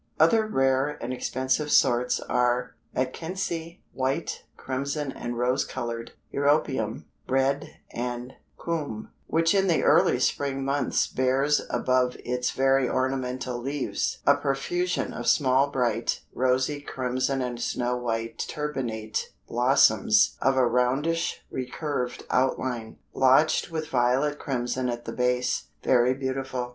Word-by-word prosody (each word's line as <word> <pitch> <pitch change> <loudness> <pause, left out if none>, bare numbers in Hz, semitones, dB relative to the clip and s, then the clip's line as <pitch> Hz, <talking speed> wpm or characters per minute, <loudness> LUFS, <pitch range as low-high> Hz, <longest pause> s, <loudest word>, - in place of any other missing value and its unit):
Other 225 -2 +4
rare 135 -3 +1
and 125 +2 -4
expensive 130 +4 -1
sorts 125 -1 +3
are 125 0 0 0.2
Atkinsii, 165 +5 -3
white, 135 +5 -2
crimson 140 +2 -3
and 120 -1 -5
rose 125 +3 +1
colored; 115 -1 -5 0.2
Europeum, 140 -6 +1 0.3
red, 135 +3 +1 0.2
and 125 +1 -4 0.2
Coum, 150 -10 -4 0.2
which 165 +1 +2
in 195 -1 +3
the 170 -3 +2
early - - +4
spring 135 -1 0
months 140 +1 +1
bears 135 +3 +1
above 130 -1 +1
its 125 0 -1
very 135 -1 +2
ornamental 130 -1 -1
leaves 135 +2 -2
"a 140 - +6
profusion 145 +6 -1
of - - -5
small 135 0 +4
bright, 120 -4 0
rosy, 130 +3 +1
crimson 130 0 -1
and 120 -1 -4
snow 125 0 -1
white 115 -2 -3
turbinate 120 -8 -3 0.2
blossoms 115 -4 +4
of 135 0 +2
a 130 - +5
roundish 130 +8 0
recurved 125 -1 -3
outline, 125 -3 0 0.2
blotched 135 +6 +4
with 160 -2 -3
violet 130 +4 +1
crimson 125 -1 -2
at 120 0 -4
the - - -5
base, 125 0 0 0.2
very 125 0 +4
beautiful." 130 -2 -3
130 Hz, 120 wpm, -26 LUFS, 125-140 Hz, 0.3 s, a